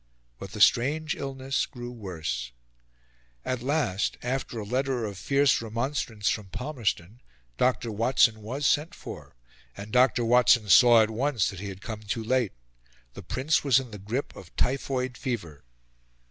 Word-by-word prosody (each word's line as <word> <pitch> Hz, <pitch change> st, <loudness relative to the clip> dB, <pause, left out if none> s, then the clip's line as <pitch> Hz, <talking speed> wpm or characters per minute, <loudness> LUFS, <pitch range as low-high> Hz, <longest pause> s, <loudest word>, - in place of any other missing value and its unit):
But 95 Hz, -, -9 dB
the 105 Hz, -, -4 dB
strange 145 Hz, +9 st, +3 dB
illness 135 Hz, 0 st, -2 dB
grew 120 Hz, -3 st, -8 dB
worse. 85 Hz, -, -5 dB, 0.9 s
At 130 Hz, -2 st, -2 dB
last, 130 Hz, -8 st, 0 dB
after 125 Hz, -1 st, -3 dB
a 105 Hz, -, -4 dB
letter 130 Hz, +1 st, -1 dB
of 100 Hz, -2 st, -5 dB
fierce 140 Hz, +7 st, +2 dB
remonstrance 115 Hz, -2 st, -3 dB
from 105 Hz, -3 st, 0 dB
Palmerston, 115 Hz, -, -3 dB, 0.4 s
Dr. 125 Hz, -2 st, +1 dB
Watson 115 Hz, 0 st, +3 dB
was 130 Hz, +7 st, -4 dB
sent 150 Hz, +4 st, +1 dB
for; -, -, -10 dB, 0.4 s
and 105 Hz, +1 st, -8 dB
Dr. 125 Hz, -1 st, +3 dB
Watson 115 Hz, -2 st, +4 dB
saw 115 Hz, +5 st, +8 dB
at 110 Hz, -, -2 dB
once 125 Hz, -1 st, 0 dB
that 95 Hz, -, -9 dB
he 100 Hz, +1 st, -5 dB
had 95 Hz, +1 st, -10 dB
come 110 Hz, -2 st, -5 dB
too 110 Hz, +2 st, -3 dB
late 125 Hz, -2 st, +1 dB, 0.6 s
The -, -, -9 dB
Prince 135 Hz, +5 st, 0 dB
was 135 Hz, -3 st, +5 dB
in 130 Hz, -3 st, -8 dB
the 105 Hz, -, -8 dB
grip 115 Hz, +8 st, -4 dB
of 85 Hz, -, -13 dB
typhoid 130 Hz, -1 st, -1 dB
fever. 85 Hz, -, -4 dB
120 Hz, 155 wpm, -27 LUFS, 105-130 Hz, 0.9 s, saw